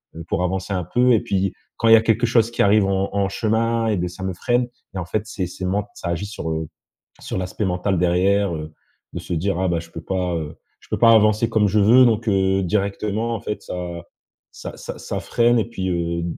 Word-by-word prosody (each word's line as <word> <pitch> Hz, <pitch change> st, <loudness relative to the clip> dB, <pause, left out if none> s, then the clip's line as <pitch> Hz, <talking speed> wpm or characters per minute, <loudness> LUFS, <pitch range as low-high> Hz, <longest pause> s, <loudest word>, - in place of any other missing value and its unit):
heu, 85 Hz, -, -7 dB
pour 90 Hz, -, 0 dB
avancer 95 Hz, +2 st, -2 dB
un 90 Hz, -2 st, -1 dB
peu. 125 Hz, +6 st, +2 dB
Et 110 Hz, -, +3 dB
puis, 95 Hz, -1 st, -1 dB, 0.2 s
quand 115 Hz, -, +1 dB
il -, -, +9 dB
y -, -, +10 dB
a 110 Hz, -, +3 dB
quelque 115 Hz, +1 st, +1 dB
chose 115 Hz, -1 st, +2 dB
qui -, -, -1 dB
arrive 100 Hz, 0 st, +4 dB
en 95 Hz, 0 st, 0 dB
en 100 Hz, -1 st, +1 dB
chemin 115 Hz, +2 st, 0 dB
et 105 Hz, -, +1 dB
bah, 90 Hz, 0 st, -2 dB
ça 90 Hz, +2 st, -9 dB
me 95 Hz, -1 st, -2 dB
freine 120 Hz, +6 st, 0 dB, 0.3 s
et -, -, -2 dB
en 85 Hz, -, -4 dB
fait, 105 Hz, +3 st, -2 dB
c'est 95 Hz, -5 st, -4 dB
c'est 90 Hz, +1 st, -6 dB
ment 100 Hz, +2 st, -1 dB
ça 85 Hz, -, -5 dB
agit 85 Hz, +3 st, -2 dB
sur, 90 Hz, -5 st, -5 dB
heu, 80 Hz, 0 st, -3 dB, 0.5 s
sur -, -, -4 dB
l'aspect 95 Hz, +3 st, -3 dB
mental, 90 Hz, 0 st, 0 dB
derrière, 90 Hz, +1 st, +2 dB
heu, 80 Hz, 0 st, -7 dB, 0.4 s
de -, -, -4 dB
se -, -, -6 dB
dire: 90 Hz, +3 st, -1 dB
«Ah 95 Hz, -, +1 dB
bah, 85 Hz, -1 st, 0 dB
je 85 Hz, 0 st, -11 dB
peux 80 Hz, -, -7 dB
pas, 90 Hz, -1 st, -2 dB
heu, 80 Hz, -1 st, -5 dB, 0.3 s
je -, -, -20 dB
peux -, -, -1 dB
pas 115 Hz, -1 st, +7 dB
avancer 110 Hz, +1 st, +4 dB
comme 110 Hz, -2 st, +2 dB
je 105 Hz, +2 st, +2 dB
veux», 120 Hz, +5 st, +6 dB
donc, 115 Hz, 0 st, +1 dB
heu, 95 Hz, 0 st, +2 dB
directement, 105 Hz, +4 st, -1 dB
en 105 Hz, -, -6 dB
fait, 105 Hz, -, -4 dB
ça 90 Hz, -1 st, -5 dB, 0.5 s
ça -, -, -9 dB
ça -, -, -7 dB
ça -, -, -4 dB
freine. 120 Hz, 0 st, +2 dB
Et -, -, 0 dB
puis, 95 Hz, -5 st, -4 dB
heu, 85 Hz, -1 st, -1 dB
100 Hz, 245 wpm, -21 LUFS, 90-110 Hz, 0.5 s, y